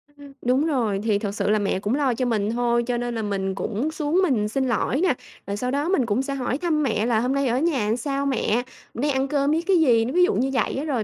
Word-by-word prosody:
Ừm, 285 -1 -13
đúng 255 +5 +2
rồi, 230 -10 0
thì 210 -3 +1
thực 205 -1 -4
sự - - -1
là 215 0 +3
mẹ 195 -2 0
cũng 210 +6 -1
lo 275 -4 +1
cho 255 +2 -1
mình 215 -3 0
thôi, 235 0 +1
cho 245 - 0
nên 240 0 -3
là 225 - -2
mình 195 -2 -2
cũng 230 +11 -2
xuống 310 +3 0
mình 235 - +1
xin 265 +3 -1
lỗi 250 +5 0
nà, 370 -7 +3 0.3
rồi 200 +1 -3
sau 250 +3 -2
đó 290 +5 -1
mình 275 -11 +2
cũng 230 +3 0
sẽ 275 +1 -3
hỏi 255 0 -2
thăm 310 -3 0
mẹ 220 -4 0
là 230 -2 +2
"Hôm 250 +3 0
nay 275 -1 +1
ở 245 +2 +1
nhà 255 -10 +1
sao 275 +2 -2
mẹ? 245 -3 0 0.3
Nay 285 +5 0
ăn 265 0 0
cơm 285 0 +1
với 320 - +1
cái 380 -2 +4
gì?" 235 -7 +4
nó 255 - -3
ví 360 0 +4
dụ 415 - +3
như 265 +2 +1
vậy 255 - 0
á 275 - -2
rồi: 255 -8 -1
250 Hz, 285 wpm, -23 LUFS, 225-285 Hz, 0.3 s, cái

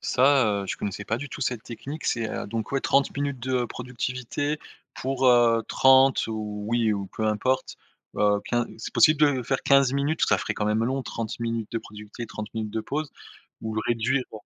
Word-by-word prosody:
Ça, 125 -7 +3
heu, - - -6
je - - -3
connaissais 105 0 -4
pas 110 - -1
du 145 +2 -6
tout - - -8
cette 125 -2 -1
technique, 140 +6 -7
c'est 115 -2 0
heu, - - -4
donc 110 +1 -4
ouais 135 -1 0
30 140 - +2
minutes 140 -3 -2
de 130 -1 0
productivité 125 +4 -3 0.4
pour, 130 0 -1
heu, 120 -2 +5
30 130 0 +5
ou 105 -1 -4
oui 115 -2 +2
ou 100 -1 -3
peu 110 - 0
importe. 130 +5 0 0.4
Heu, 105 -1 +3
15 120 0 0
c'est - - -7
possible 155 -1 +5 0.2
de 125 - -2
faire 135 +3 -1
15 140 -2 +4
minutes? 145 +3 0
Ça - - +4
ferait - - -3
quand 105 - -1
même 110 +2 +1
long 130 +2 -1
30 115 -2 -5
minutes 115 -2 -2
de 115 - 0
productivité, 105 +3 -9
30 105 -1 -7
minutes 110 -1 -3
de 110 0 -2
pause, 145 +5 -3 0.5
ou 110 -1 -4
le 110 - 0
réduire 120 +3 +1
bon 110 - -9
120 Hz, 205 wpm, -26 LUFS, 110-135 Hz, 0.5 s, heu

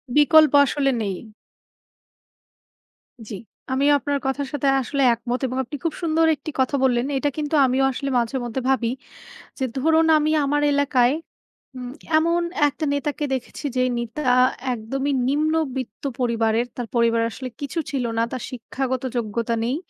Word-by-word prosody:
বিকল্প 300 0 +6
আসলে 275 -1 +1
নেই। 200 -3 -2 2.1
জি। 210 - -5 0.4
আমিও 275 +2 +3
আপনার 285 0 -1
কথার 270 +1 -1
সাথে 285 -1 -1
আসলে 275 +2 -2
একমত 240 +2 -3
এবং 255 - -4
আপনি 260 +4 -8
খুব 330 -2 -1
সুন্দর 325 -1 +2
একটি 310 - -7
কথা 260 +2 +2
বললেন 245 -2 +2
এটা 290 +2 0
কিন্তু 300 +1 -1
আমিও 265 +1 +2
আসলে 275 +2 -4
মাঝে 235 +3 -2
মধ্যে 240 +2 -3
ভাবি। 235 -3 +1 0.7
যে - - -1
ধরুন 320 +4 +3
আমি 305 0 +1
আমার 290 +1 +1
এলাকায় 270 -3 +3 0.6
উম 250 -1 -6 0.3
এমন 335 +2 +2 0.3
একটা 295 +2 -4
নেতাকে 290 +1 -2
দেখেছি 265 +3 -5
যেই 255 0 +2
নেতা 235 +5 -5 0.5
একদমই 270 +5 -3 0.2
নিম্নবৃত্ত 285 -5 -1 0.2
পরিবারের। 230 -1 +1
তার 245 -2 -4
পরিবার 230 -1 +3
আসলে 255 +2 -7
কিছু 285 +4 -3
ছিল 270 -3 -1
না। 230 - +2
তার 255 - -4
শিক্ষাগত 260 +1 -4
যোগ্যতা 230 0 -1
নেই। 245 +4 0
265 Hz, 150 wpm, -22 LUFS, 240-290 Hz, 2.1 s, বিকল্প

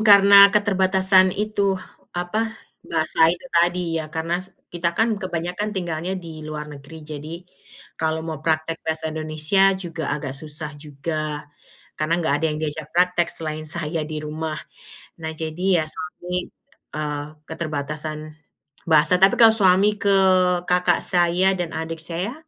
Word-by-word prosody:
karena 200 -1 +8
keterbatasan 190 -2 +4
itu 200 -2 0 0.4
apa, 215 +6 -2 0.4
bahasa 160 +1 +3
itu 175 +8 -2
tadi. 170 -1 +1
Ya 155 - -7
karena 165 +3 -2
se 190 0 -15 0.2
kita 170 -1 -2
kan 225 -2 +1
kebanyakan 180 +2 -3
tinggalnya 175 +1 -3
di 165 -3 -9
luar 155 -1 -6
negeri. 150 +3 -12
Jadi, 150 +1 -7 0.7
kalau 160 0 -1
mau 160 -3 -5
praktek 160 +1 -1
bahasa 160 0 -2
Indonesia, 155 +5 +2
juga 165 -5 -5
agak 140 -3 -5
susah 150 +2 -4
juga. 150 +1 -4 0.5
Karena 165 +3 0
nggak 160 -4 0
ada 150 +2 -1
yang 150 - -4
diajak 155 -1 -4
praktek 180 0 +2
selain 155 -1 -4
saya 155 0 -3
di 155 0 -5
rumah. 155 0 -4 0.6
Nah, 160 -1 -5
jadi 165 +3 0
ya - - -3
suami, 180 0 -5 0.5
eee, 150 -1 -3 0.2
keterbatasan 155 -1 -5 0.6
bahasa. 160 +3 +5
Tapi 195 0 +5
kalau 225 -2 +8
suami 200 0 +4
ke 200 - +1 0.6
kakak 180 -1 +2
saya, 180 +1 +2
dan 175 -3 -3
adik 160 0 -5
saya, 175 +7 -3
165 Hz, 140 wpm, -22 LUFS, 155-185 Hz, 0.7 s, karena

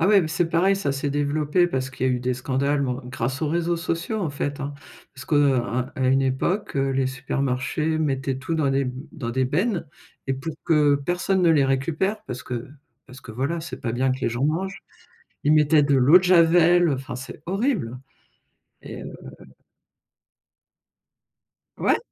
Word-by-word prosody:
Ah 165 - +3
ouais, 205 -1 +6
bah, 160 - -2
c'est 165 +1 0
pareil, 185 +4 +3
ça 145 -8 -1
s'est 140 +1 -2
développé 150 +4 +1
parce 130 -4 -3
qu'il 130 0 -2
y - - +2
a - - +2
eu 125 - -1
des 125 0 -1
scandales 140 +2 0
ou - - -1
en 125 0 -5
grâce 130 +3 -3
aux 150 - +1
réseaux 170 +1 0
sociaux, 165 +6 -2
en 165 -6 -1
fait, 145 0 -4
hein. 140 +1 -4 0.4
Parce 130 -1 -10
que, 150 - -1
heu, 140 -2 +4
à 125 +1 -2
à 130 -1 0
une 135 +1 +3
époque, 140 +8 -1
heu, 135 0 +1
les 135 -1 +1
supermarchés 135 +4 -1
mettaient 135 -3 -1
tout 135 +5 -3
dans 150 -4 +1
des 135 0 +1
b 125 - -3 0.2
dans 120 -8 -5
des 130 +2 +1
bennes 170 - -1 0.4
et 135 - +1
pour 145 +4 -6
que 150 -3 +4
personne 175 +6 0
ne 170 - +5
les 150 -4 +4
récupère 155 +10 -1
parce 125 +1 -6
que 120 -1 -5 0.4
parce 125 +1 -13
que, 115 -3 -10
voilà, 140 +8 -2
c'est 160 - -8
pas 115 -4 -2
bien 130 +2 +1
que 130 - -4
les - - +1
gens 120 +3 -2
mangent. 180 +6 -2 0.6
Ils 150 - +3
mettaient 150 0 +5
de 140 -1 +3
l'eau 140 +8 +7
de - - -6
javel, 175 -1 +5
heu, 145 - +2
enfin, 130 -1 -6
c'est 130 +1 -9
horrible 195 - -1 0.8
et - - -8
heu - - -8 2.6
Ouais. - - +2
140 Hz, 200 wpm, -24 LUFS, 130-165 Hz, 2.6 s, l'eau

